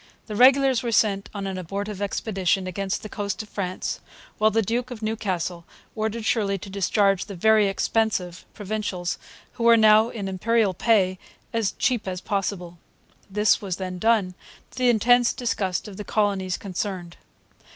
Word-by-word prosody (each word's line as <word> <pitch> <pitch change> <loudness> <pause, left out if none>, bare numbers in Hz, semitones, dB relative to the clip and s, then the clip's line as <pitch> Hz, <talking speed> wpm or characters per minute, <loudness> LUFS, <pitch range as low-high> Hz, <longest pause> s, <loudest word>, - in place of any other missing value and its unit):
The 215 - -6
regulars 265 +1 +5
were 235 - -2
sent 200 -3 +2
on 200 -2 -5
an 190 -1 -3
abortive 200 +3 -5
expedition 195 -2 0
against 190 +2 -3
the - - -5
coast 205 0 -4
of 210 - -16
France, 185 -2 -3 0.4
while 215 +1 +5
the 225 +1 +1
Duke 240 +4 -2
of 235 -3 -8
Newcastle 185 -6 -2 0.3
ordered 220 +1 -2
Shirley 200 -4 +1
to 195 +1 -10
discharge 195 0 +2
the 200 - -8
'very 215 +3 +4
expensive' 195 -3 -1
Provincials, 205 -4 -3 0.3
who 235 - -6
were 235 0 +7
now 220 +1 +6
in 205 -5 -5
Imperial 205 +2 +1
pay, 185 -2 +2 0.3
'as 225 -3 0
cheap 245 -5 0
as 185 -1 -3
possible.' 180 -3 -3 0.5
This 210 +2 +2
was 190 -4 -3
then 185 -1 -5
done, 215 -3 +2 0.4
to - - -9
the 250 -1 +4
intense 240 +1 +4
disgust 200 -6 -2
of 200 -2 -10
the 210 - -5
colonies 200 -4 0
concerned. 185 -2 -5
205 Hz, 160 wpm, -24 LUFS, 190-220 Hz, 0.5 s, were